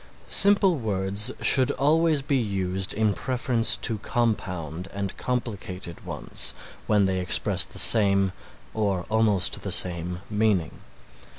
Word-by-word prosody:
Simple 195 -3 +4
words 100 +1 +1
should 130 0 +5
always 155 0 +2
be 140 0 -1
used 95 -4 -2
in 110 -1 +1
preference 125 0 0
to 110 -3 +1
compound, 90 -8 -3
and 100 -1 -5
complicated 100 -8 -5
ones - - -5 0.3
when 105 -2 +2
they 95 -1 -1
express 90 - +2
the - - -10
same 100 -4 +3 0.4
or 100 -5 -1
almost 105 -4 +1
the 100 - -5
same 90 0 0
meaning. 105 -6 -1
105 Hz, 120 wpm, -24 LUFS, 95-120 Hz, 0.4 s, should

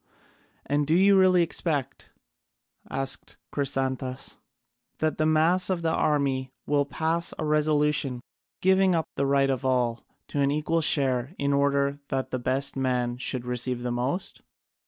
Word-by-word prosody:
"And 145 +1 0
do 160 - +3
you 195 +2 +5
really 185 -2 +5
expect," 145 -5 -2 0.8
asked 135 0 -3 0.2
Chrysantas, 130 -2 -2 0.6
"that 155 0 -1
the 155 - +3
mass 165 +4 +3
of 180 -3 -1
the 165 - +1
army 135 -3 0 0.2
will 145 -1 +1
pass 165 +3 -1
a 155 - -3
resolution 150 -3 +1 0.4
giving 190 -1 +4
up 160 -2 0
the 140 - 0
right 135 0 +3
of 130 0 -2
all 125 -3 0 0.3
to 145 - -1
an 140 - +3
equal 155 +3 0
share 135 -1 0
in 140 0 0
order 140 0 +1
that 135 -1 -3
the 130 - -2
best 135 +3 -1
men 125 -2 -1
should 125 -1 -2
receive 125 0 -2
the 125 - -2
most?" 125 +10 -3
140 Hz, 150 wpm, -26 LUFS, 130-155 Hz, 0.8 s, you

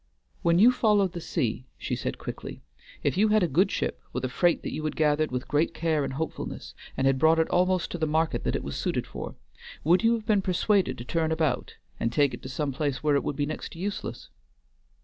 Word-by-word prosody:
"When 170 0 +3
you 225 +7 +7
followed 210 -6 +3
the 170 -1 -6
sea," 125 -3 -2
she - - -3
said - - -3
quickly, - - -7 0.4
"if - - +1
you 215 +3 +5
had 215 -2 +4
a - - +3
good 175 +7 +3
ship - - -2
with 130 0 -2
a - - -2
freight 175 +7 +2
that - - -4
you 155 - -4
had 155 -1 -2
gathered 155 0 +2
with 125 0 -4
great 150 +4 +1
care 160 -3 +1
and 135 - -3
hopefulness, 160 +4 -5 0.2
and 135 - +1
had 135 -1 +3
brought 160 +3 +5
it 160 - +3
almost 185 0 +2
to 175 - -4
the 155 - +1
market 160 +1 0
that - - 0
it - - -2
was - - -5
suited - - -1
for, - - -7 0.5
would 175 +4 +4
you 230 +1 +5
have 225 -2 -3
been 210 -3 +3
persuaded 190 -5 +1
to 120 - -7
turn 160 +3 0
about 160 -5 0 0.2
and 115 - 0
take 140 +2 +2
it - - -7
to 130 - -8
some 140 +1 -2
place 140 0 -2
where 150 -1 +3
it 140 - +1
would 145 - -2
be 145 0 0
next 155 +2 -5
to - - -12
useless?" 200 +3 -5
160 Hz, 240 wpm, -27 LUFS, 145-185 Hz, 0.5 s, you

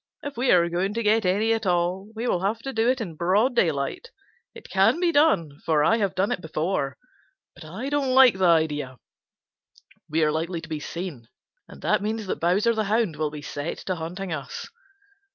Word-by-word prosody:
If 285 0 -6
we 250 +2 0
are 170 -1 +5
going 180 +4 -1
to 230 - -1
get 215 -1 +3
any 210 +5 +2
at 220 -3 -2
all, 180 +3 0
we 230 +3 -3
will 180 - 0
have 200 +4 0
to 270 - -5
do 225 +2 +2
it 260 +1 +1
in 180 -7 -5
broad 200 - +2
daylight. 160 - 0 0.5
It - - -12
can - - +3
be 350 -1 +2
done, 195 - +2
for 155 -2 +2
I 225 +9 +4
have 200 -4 -1
done 190 +2 +1
it 180 - -2
before, 155 -4 -2 0.6
but 175 - -13
I 190 - -6
don't 285 -2 0
like 255 -7 +6
the 190 - +3
idea. 150 -6 +1 1.1
We 160 +1 +1
are 150 - +3
likely 165 +3 -2
to 160 - -10
be 155 -2 -4
seen, 160 -8 -6 0.4
and - - -14
that - - +2
means 215 +1 -3
that 185 - -3
Bowser 195 +7 +2
the 220 -1 -1
Hound 210 -5 +1
will 155 0 -1
be 150 0 -9
set 145 +2 -5
to 185 - -1
hunting 180 +2 -5
us." 140 -4 -6
185 Hz, 205 wpm, -25 LUFS, 160-225 Hz, 1.1 s, like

